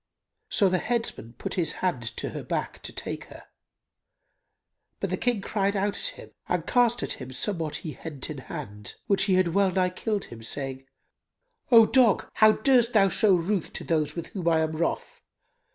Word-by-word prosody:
So 200 - +3
the 185 -1 +1
headsmen 225 - -2
put 120 - -5
his 175 -3 +1
hand 180 -9 -1 0.2
to - - -2
her - - -6
back, - - -4
to - - -6
take - - -5
her; - - -13 1.6
but 195 - -2
the - - +2
King 240 +1 0
cried 200 0 0
out 200 +1 0
at - - -6
him - - -12 0.2
and - - 0
cast 240 -1 +2
at - - -1
him 130 0 -7
somewhat 160 +3 -2
he 160 - -5
hent 150 -3 -5
in 150 -3 -6
hand, 105 -4 -7
which 200 0 +2
had 185 -2 +3
well 195 +3 +3
nigh 180 0 +1
killed 205 +2 -2
him, 115 -1 -11
saying, 135 +3 -5 0.8
"O 230 -2 +9
dog, 245 -3 +4
how 215 0 +6
durst 245 0 +3
thou 195 -3 +5
show 195 +1 +4
ruth 180 +1 -1
to - - -5
those 155 -2 0
with 170 -1 -5
whom 180 -4 -5
I 165 -1 +4
am 160 0 0
wroth? 160 +1 -3
185 Hz, 185 wpm, -26 LUFS, 155-210 Hz, 1.6 s, O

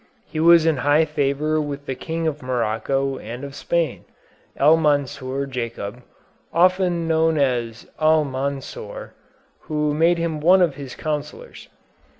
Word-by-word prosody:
He 155 - -6
was 170 0 +6
in 160 -3 +2
high 145 +4 +3
favor 150 +1 0
with 145 -1 -5
the 135 - -3
King 160 +5 -4
of 150 -2 -2
Morocco 130 +2 -1
and 120 +4 -8
of 140 -1 -7
Spain, 170 +3 -1 0.5
El 150 +3 +6
Mansur 140 -3 0
Jacub, 120 -3 -5 0.5
often 180 -1 +2
known 160 0 +2
as 120 -5 -1
Almansor, 150 - -1 0.5
who 150 -1 -1
made 165 +3 +3
him 165 -2 -2
one 180 +4 +5
of 165 -5 +1
his 135 -2 -9
counsellors. 155 - -6
150 Hz, 135 wpm, -22 LUFS, 135-160 Hz, 0.5 s, was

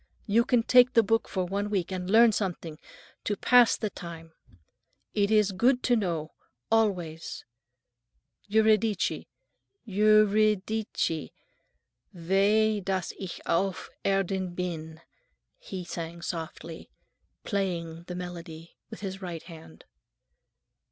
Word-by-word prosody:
You 230 +3 +3
can 245 -3 +2
take 250 +1 +5
the 230 - +5
book 225 +2 +1
for 185 -2 -2
one 200 +3 -2
week 190 -3 -1
and 185 -1 -4
learn 225 +2 +6
something, 175 -6 -3 0.4
to 205 - -2
pass 245 -2 +5
the 215 -3 -3
time. 165 -2 -10 0.8
It 200 -1 +1
is 210 -2 +3
good 245 +7 +2
to 245 - +3
know—always. 170 - -2 1.1
Euridice, 220 -1 +2 0.6
Eu—ri—di—ce, 215 - +2 0.9
weh 205 +5 +2
dass 190 -2 -2
ich 190 -3 -6
auf 190 +2 -1
Erden 190 -2 -1
bin!" 160 -3 -5 0.6
he 190 - -7
sang 170 0 -6
softly, 165 -1 -6 0.5
playing 170 -5 -3
the 180 - -5
melody 170 -2 -8
with 220 - -10
his 195 -1 -5
right 175 -3 -6
hand. 160 - -13
190 Hz, 110 wpm, -28 LUFS, 170-215 Hz, 1.1 s, learn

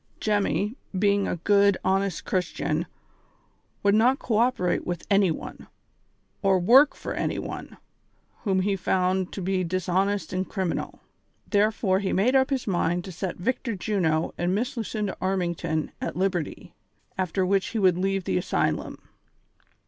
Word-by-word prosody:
Jemmy, 210 +2 0 0.2
being 200 0 +2
a - - -1
good, 200 +2 +3
honest 190 -2 0
Christian, 185 -1 -1 1.0
would 200 0 +4
not 240 +5 +4
co 230 -6 -1
operate 230 -7 +1
with 175 -2 -4
any 195 -2 +5
one, 160 - -6 0.7
or 195 -2 +3
work 250 +11 +6
for - - -5
any - - -2
one, - - -6 0.6
whom 190 -3 +1
he 200 +1 +1
found 185 0 0
to 195 - -5
bp 185 -1 0
dishonest 185 +3 0
and 185 +1 -2
criminal; 190 -4 -3 0.5
therefore 205 -2 +2
he 195 -1 -1
made 240 +8 +2
up 265 0 +4
his 270 -3 -1
mind 175 -2 0
to 190 - -7
set 180 +1 -4
Victor 235 +3 -2
Juno 175 -5 0
and 175 +2 +1
Miss 240 +6 -2
Lucinda 215 -3 -3
Armington 170 -4 -1
at - - -3
liberty, 185 -4 -2 0.4
after 185 0 0
which 195 +1 +1
he 230 - -4
would 185 -4 +4
leave 195 0 0
the 95 - 0
asylum. - - -1
195 Hz, 150 wpm, -26 LUFS, 180-205 Hz, 1.0 s, work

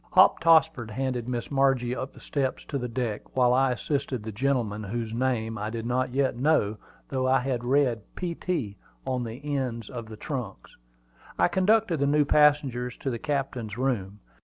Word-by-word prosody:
Hop - - +6
Tossford 160 -7 +4
handed 125 0 -2
Miss 120 +1 -3
Margie 135 -3 +2
up 130 +1 -4
the - - -14
steps 135 -3 -2
to 140 - -3
the 125 - -3
deck, 115 -3 -2 0.2
while 125 -1 +5
I 135 0 +3
assisted 135 -2 -2
the 110 - -5
gentleman, 115 -3 -1
whose 115 +2 -3
name 115 -3 -1
I 105 +1 -2
did 115 0 -5
not 125 +2 0
yet 135 0 +1
know, 120 -6 +2 0.3
though 130 -1 0
I 130 +1 +4
had 125 -2 -2
read 125 -3 +2
"P. 175 -2 -3
T." 145 - -3 0.3
on 130 -1 -1
the 115 +2 -7 0.2
ends 115 -5 -3
of 120 -3 -6
the 110 -1 -9
trunks. 120 -6 -6 0.6
I - - +4
conducted 190 -1 +2
the 140 - +2
new 145 +1 +3
passengers 140 -5 +3
to 135 - -3
the 115 - -4
captain's 135 -7 -3
room. 105 -6 -2
125 Hz, 185 wpm, -27 LUFS, 115-140 Hz, 0.6 s, Hop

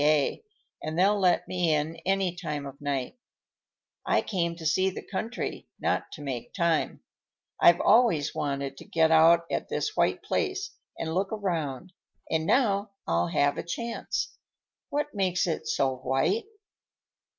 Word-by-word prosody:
W.C.A., 150 - +2 0.4
and 155 +1 -4
they'll 200 +3 +4
let 180 -2 +3
me 175 -4 +1
in 150 +2 -1
any 190 -2 +1
time 150 -6 -4
of 140 +1 -9
night. 140 - -3 0.8
I - - +2
came 170 -4 -1
to 165 -1 -9
see 185 +4 +3
the 185 - -8
country, 225 +4 -4
not - - -1
to 150 - -8
make 130 -4 -5
time. 170 -4 0 0.6
I've 175 0 +7
always 210 - +4
wanted 140 -2 -3
to - - -11
get 160 -1 +2
out 165 +1 +6
at - - -2
this 430 - -2
white - - +1
place 395 -1 -1 0.3
and 160 0 -3
look 190 +3 0
around, 175 -5 -3 0.4
and 160 0 +1
now 205 -5 +2
I'll 85 +1 +1
have 145 +11 +1
a - - -3
chance. 235 +7 -3 0.5
What 295 +1 -2
makes 185 -3 +1
it 165 -3 -2
so 135 -2 +1
white?" 135 - 0
170 Hz, 150 wpm, -28 LUFS, 150-195 Hz, 0.8 s, I've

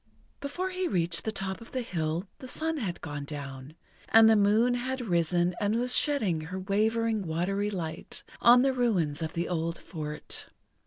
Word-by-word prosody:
Before 360 +7 -3
he 365 0 -1
reached 170 - 0
the 220 - 0
top 195 0 -3
of 230 - -13
the 255 -1 -1
hill 165 -2 -2
the 260 - -8
sun 320 +5 -1
had 195 -10 -3
gone 145 -2 -5
down, 140 0 -7 0.3
and 225 0 +8
the 220 - +6
moon 215 +4 +4
had 260 +2 -2
risen 175 -4 +1
and 205 +1 +1
was 245 +2 +2
shedding 215 - +1
her 180 +4 -5
wavering, 220 +3 +1
watery 190 +4 -1
light 170 -6 -6 0.2
on 245 +1 +7
the 270 -1 +2
ruins 185 - +1
of 160 0 -3
the 170 +1 -2
old 165 -1 -2
fort. 150 -3 -6
195 Hz, 175 wpm, -29 LUFS, 165-235 Hz, 0.3 s, and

